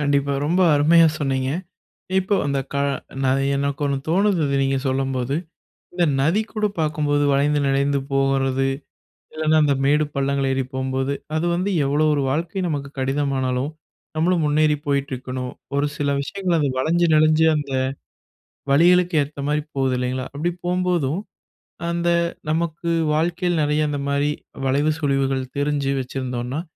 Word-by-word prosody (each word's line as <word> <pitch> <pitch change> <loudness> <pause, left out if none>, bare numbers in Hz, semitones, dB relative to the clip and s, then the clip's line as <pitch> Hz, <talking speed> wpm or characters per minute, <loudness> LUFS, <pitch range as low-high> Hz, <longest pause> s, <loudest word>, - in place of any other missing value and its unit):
கண்டிப்பா. 140 -1 +1
ரொம்ப 175 +4 +2
அருமையா 165 +3 +6
சொன்னீங்க. 135 -2 -1 0.7
இப்போ 190 +2 +1
அந்த 140 -1 0
க - - -2 0.5
ந - - +2 0.3
எனக்கு 140 +1 -1
ஒண்ணு 140 -1 0
தோணுது, 190 +1 +2
அத 140 0 0
நீங்க 135 0 +1
சொல்லும்போது. 135 0 -1 0.6
இந்த 175 -1 +1 0.2
நதி 165 +10 +2
கூட 215 -1 0
பார்க்கும்போது 145 -1 +1
வளைந்து 145 +1 +2
நெலிந்து 140 +1 +1
போகுறது. 135 -1 +1 0.7
இல்லைனா 155 0 +2
அந்த 145 -2 +3
மேடு 150 +2 +3
பள்ளங்கள் 140 0 0
ஏறி 135 0 0
போம்போது, 130 +1 -1 0.2
அது 165 +2 0
வந்து 185 +3 -1
எவ்வளோ 145 +3 +1
ஒரு 145 - 0
வாழ்க்கை 165 +6 -2
நமக்கு 140 -3 -3
கடினமானாலும், 135 0 -1 0.5
நம்மளும் 170 0 +2
முன்னேறி 150 0 +3
போயிட்டிருக்கணும். 130 -2 -2 0.3
ஒரு 145 +1 +2
சில 145 -1 -1
விஷயங்கள் 180 +3 -1
அது 145 -2 +1
வளைஞ்சு 170 +5 +2
நெளிஞ்சு, 155 +1 +4
அந்த 145 -2 -4 1.0
வழிகளுக்கு 175 +3 +4
ஏத்த 145 +1 -10
மாரி 150 0 +1 0.2
போகுது 130 -1 +1
இல்லைங்களா? 125 +1 -2
அப்படி 160 +5 -1 0.2
போகும்போதும், 180 -3 0 0.7
அந்த 170 0 0 0.4
நமக்கு 170 +1 -1 0.2
வாழ்க்கையில 170 +2 0
நிறைய 150 +1 +1
அந்த 145 -1 -2
மாரி 145 +1 +1 0.4
வளைவு, 145 +4 +2
சுழிவுகள் 135 -2 0 0.2
தெரிஞ்சு 145 -1 0
வச்சிருந்தோம்னா, 130 +2 -3
145 Hz, 135 wpm, -22 LUFS, 135-160 Hz, 1.0 s, அருமையா